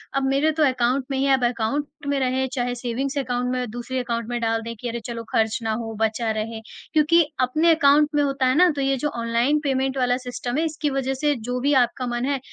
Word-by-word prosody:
अब 275 - +1
मेरे 275 +4 +2
तो 315 - +4
अकाउंट 255 -1 +1
में 270 - 0
ही 265 - +1
है, 275 - +4
अब 260 -2 +2
अकाउंट 240 +4 -1 0.2
में 285 0 +1
रहे 260 0 0
चाहे 245 -2 -1
सेविंग्स 255 +4 -3
अकाउंट 250 -2 -1
में 250 -2 -2
दूसरे 245 +2 -4
अकाउंट 235 -2 -3
में 240 0 -2
डाल 225 0 0
दें 230 +1 -6
कि 245 - -4
अरे! 235 +1 -4
चलो 235 -1 -5
ख़र्च 220 0 +1
ना 220 - 0
हो 225 -1 -5
बचा 225 +1 0
रहे। 220 +1 -3 0.3
क्योंकि 315 +2 +5 0.2
अपने 310 +7 +3
अकाउंट 295 0 +4
में 295 - +3
होता 275 -2 0
है 255 - +2
ना 360 0 +6
तो 280 - -2
ये 270 0 +1
जो 295 - -1
ऑनलाइन 235 +6 +1
पेमेंट 265 -1 0
वाला 250 -1 +2
सिस्टम 250 0 -4
है 320 - +1
इसकी 310 -1 -2
वजह 270 -1 -1
से 290 +2 0
जो 250 - -1
भी 285 +2 +2
आपका 245 +1 -1
मन 240 +1 -2
है 280 -1 0
255 Hz, 245 wpm, -23 LUFS, 240-280 Hz, 0.3 s, ना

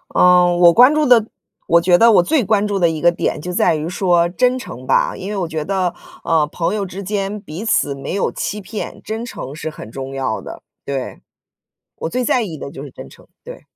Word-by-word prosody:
嗯， 180 -1 +5
我 175 -1 +7
关 250 +5 +7
注 305 -1 +2
的 240 -4 +5 0.4
我 170 0 +4
觉 175 0 +4
得 230 +5 +6
我 180 -5 +5
最 300 - +1
关 210 0 +1
注 205 -1 -1
的 170 -2 +3
一 160 -1 -4
个 175 - +5
点 170 - -2
就 180 - -5
在 165 - +2
于 155 +2 -4
说 175 -2 +2
真 250 +7 +1
诚 130 - -9
吧。 - - +1
因 195 +3 -6
为 210 - -3
我 180 -3 -2
觉 160 -2 -4
得， 190 -2 -1 0.3
呃， 160 -2 +2
朋 165 +6 -2
友 205 -2 -2
之 190 +1 -7
间 200 +1 -3
彼 180 +4 -8
此 145 -10 +1
没 135 +3 -6
有 195 - 0
欺 210 +2 -4
骗， 210 +2 -7
真 225 +2 -5
诚 140 - -8
是 160 0 -5
很 130 -8 -10
重 135 +2 -7
要 130 -5 -2
的， - - -10 0.2
对。 135 -2 -5 0.8
我 - - -4
最 250 +6 -2
在 245 - +2
意 170 -7 -6
的 140 - -7
就 140 -3 -9
是 145 - -10
真 - - -11
诚， - - -18 0.2
对。 - - -10
180 Hz, 250 characters per minute, -18 LUFS, 160-210 Hz, 0.8 s, 我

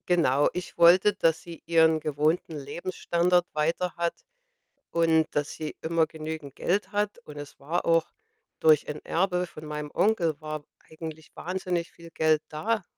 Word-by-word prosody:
Genau, 145 -6 +3
ich 180 0 -6
wollte, 180 +4 +6
dass 165 -4 +1
sie 170 0 -10
ihren 160 -1 +4
gewohnten 155 +2 0
Lebensstandard 175 +4 0
weiter 165 +4 0
hat 170 0 0 0.8
und 165 -1 +3
dass 145 -1 0
sie 155 -1 -6
immer 160 0 +1
genügend 155 -2 -7
Geld 200 +4 -1
hat. 205 +2 -1
Und 150 - -10
es 145 -1 -9
war 155 +6 -2
auch 165 -1 +3 0.5
durch 155 -2 +4
ein 150 - -4
Erbe 180 0 +1
von 155 -3 -11
meinem 150 -1 -5
Onkel 170 -8 +2
war 155 -1 -5 0.3
eigentlich 160 -1 -8
wahnsinnig 180 -1 -3
viel 170 0 -14
Geld 155 -1 +2
da 210 +7 -1
165 Hz, 155 wpm, -27 LUFS, 155-175 Hz, 0.8 s, wollte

